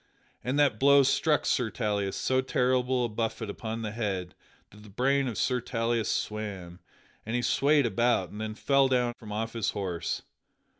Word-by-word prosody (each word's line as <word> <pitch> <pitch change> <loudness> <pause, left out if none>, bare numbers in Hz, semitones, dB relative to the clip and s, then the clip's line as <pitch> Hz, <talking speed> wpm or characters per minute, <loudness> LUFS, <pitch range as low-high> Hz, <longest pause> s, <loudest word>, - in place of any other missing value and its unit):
And 130 +3 -1
that 145 -1 +3
blow 140 +1 +6
struck 150 +3 +2
Sir 125 -4 +1
Tauleas 105 -4 -2
so 130 0 +1
terrible 125 -1 +1
a - - 0
buffet 110 -1 -3
upon 115 +1 -5
the 105 - -3
head 100 -5 -3 0.4
that 105 - -15
the 105 - -14
brain 135 +6 +1
of 115 - -4
Sir 125 -2 +1
Tauleas 115 -1 -1
swam, 100 -5 -4 0.4
and 110 +2 -4
he 125 - 0
swayed 145 +1 +3
about 120 -6 +1
and 105 - -7
then 110 0 -4
fell 135 +3 +3
down 125 -2 +1
from 110 -3 -12
off 110 +2 -3
his 115 -3 -1
horse. 90 -4 -3
115 Hz, 180 wpm, -28 LUFS, 105-130 Hz, 0.4 s, blow